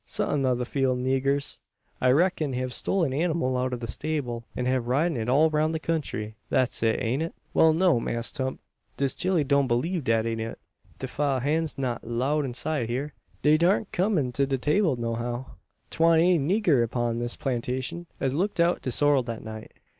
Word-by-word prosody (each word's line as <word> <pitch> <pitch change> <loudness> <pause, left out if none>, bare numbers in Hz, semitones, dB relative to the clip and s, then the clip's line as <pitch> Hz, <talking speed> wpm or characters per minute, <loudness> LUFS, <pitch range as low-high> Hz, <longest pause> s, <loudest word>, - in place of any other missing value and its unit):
Some 140 -3 0
o' 125 - +2
the 125 0 -2
field 130 -1 0
niggers, 135 +2 0 0.4
I 130 - +4
reck'n, 155 0 +2
hev 130 0 -2
stole 195 - 0
the 135 +3 -1
anymal 160 -7 0
out 125 0 0
o' - - -1
the 120 -1 -6
stable, 125 -3 -3
an 125 - -2
hev 130 0 +1
been - - -6
ridin' 150 +4 +1
it 115 +1 -2
all 155 +5 +4
roun' 155 +1 +1
the 160 - -1
country. 145 -10 -3 0.2
That's 130 -1 +1
it, 115 -1 +2
ain't 125 +4 -1
it?" 165 - -4 0.2
"Well, 160 - +5
no, 165 -4 +3
Mass' 115 0 -2
Tump. 130 -2 -3 0.4
Dis 140 -1 +1
chile 185 -4 +1
doan 140 -1 +2
believe 145 +8 0
dat 115 -1 +1
am 115 -1 -2
it. 110 0 -4 0.4
De 130 - -5
fiel' 135 0 0
hands 155 +4 -1
not 125 -3 -2
'lowed 135 +6 0
inside 130 0 -2
hyur. 140 +5 -3 0.3
Dey 150 +1 +5
darn't 185 +5 +2
kum 195 +2 +1
in 130 -5 0
to 140 +2 0
de 135 -1 0
'table 150 +3 +2
no 115 -1 -2
how. 120 +2 -3 0.5
'Twan't 165 0 +4
any 180 -1 +4
nigger 160 - +2
upon 120 0 -1
dis 120 0 -1
plantashun 130 +6 -3
as 135 -1 0
tooked 185 +5 -1
out 170 +1 +3
de - - -3
sorrel 145 +2 +3
dat 115 -2 -6
night." 110 0 -8
135 Hz, 205 wpm, -26 LUFS, 120-155 Hz, 0.5 s, Well